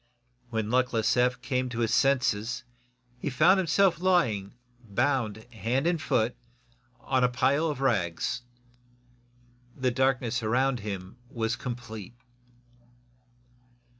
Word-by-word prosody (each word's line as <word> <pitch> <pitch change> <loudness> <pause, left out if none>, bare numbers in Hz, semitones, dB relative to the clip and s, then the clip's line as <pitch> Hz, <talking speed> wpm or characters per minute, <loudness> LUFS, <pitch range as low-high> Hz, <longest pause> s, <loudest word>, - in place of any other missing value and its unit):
When 110 -2 -2
luckless 125 -3 +2
Eph 125 0 +2
came 130 -1 -1
to 120 -1 -3
his 115 - +1
senses 125 -3 +1 0.6
he 145 - -2
found 170 +9 +4
himself 185 +1 +3
lying, 125 - +1 0.3
bound 110 0 0
hand 115 - -1
and 170 -2 +1
foot, 120 -4 +1 0.7
on 130 -1 +1
a 125 - +4
pile 140 +6 +2
of 145 -4 -3
rags. 100 -3 0 1.4
The 130 -2 +1
darkness 125 -2 +1
around 125 +3 +1
him 100 -1 -6
was 115 -2 -1
complete. 120 -5 -7
125 Hz, 110 wpm, -28 LUFS, 110-135 Hz, 1.4 s, found